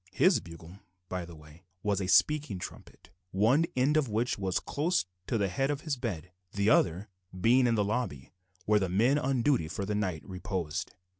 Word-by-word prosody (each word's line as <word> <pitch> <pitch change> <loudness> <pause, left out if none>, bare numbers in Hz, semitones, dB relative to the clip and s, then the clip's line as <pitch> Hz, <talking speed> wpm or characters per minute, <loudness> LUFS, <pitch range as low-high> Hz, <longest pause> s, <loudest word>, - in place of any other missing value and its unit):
His 185 - +4
bugle, 85 +2 -12 0.3
by 90 -1 -3
the 85 -1 -11
way, 75 +2 -16 0.2
was 100 -2 0
a 95 - -2
speaking 150 -1 +3
trumpet, - - -10 0.2
one 115 - +3
end 135 +4 +3
of 145 -6 +1
which 115 +4 0
was 95 -2 -1
close 160 - 0 0.2
to 120 - 0
the 100 -2 +1
head 135 +10 -1
of 145 0 -2
his 155 -3 -2
bed, 95 -9 -5 0.2
the 100 +2 +2
other 85 -1 +4 0.4
end 90 - -9
being 125 +2 +5
in 115 - +2
the 105 -2 +1
lobby 100 - -3 0.3
where 105 0 +4
the 95 -2 -1
men 120 +10 +3
on 130 -3 0
duty 125 - +2
for 100 +4 -4
the 105 - -2
night 95 -6 -2
reposed. 90 -3 -4
105 Hz, 200 wpm, -30 LUFS, 90-130 Hz, 0.4 s, being